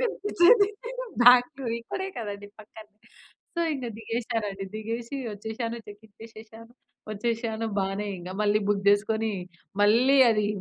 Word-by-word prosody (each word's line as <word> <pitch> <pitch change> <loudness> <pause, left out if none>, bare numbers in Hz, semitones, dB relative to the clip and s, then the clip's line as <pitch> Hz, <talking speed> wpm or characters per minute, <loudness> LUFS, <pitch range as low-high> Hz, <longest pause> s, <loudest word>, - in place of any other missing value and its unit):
కనిపించేది 415 -1 +4 0.5
బెంగుళూరు 245 0 +5
ఇక్కడే 380 +11 -5
కదండీ! 205 -2 -6
పక్కన. 215 0 -14 0.7
సో, - - 0
ఇంక 260 -3 -5
దిగేసానండి. 225 -3 -3
దిగేసి 230 +4 -5 0.2
వచ్చేసాను 220 +3 -5
చెక్ 205 +1 -13
ఇచ్చేసాను, 225 +1 -14 0.4
వచ్చేసాను 225 +1 -2
బానే 195 +2 -2
ఇక 180 +1 -8
మళ్ళీ 210 0 +3
బుక్ 200 -1 0
జేసుకొని 220 +2 +2 0.5
మళ్ళీ 240 +7 +5
అది 210 -2 +1
225 Hz, 115 wpm, -26 LUFS, 210-235 Hz, 0.7 s, బెంగుళూరు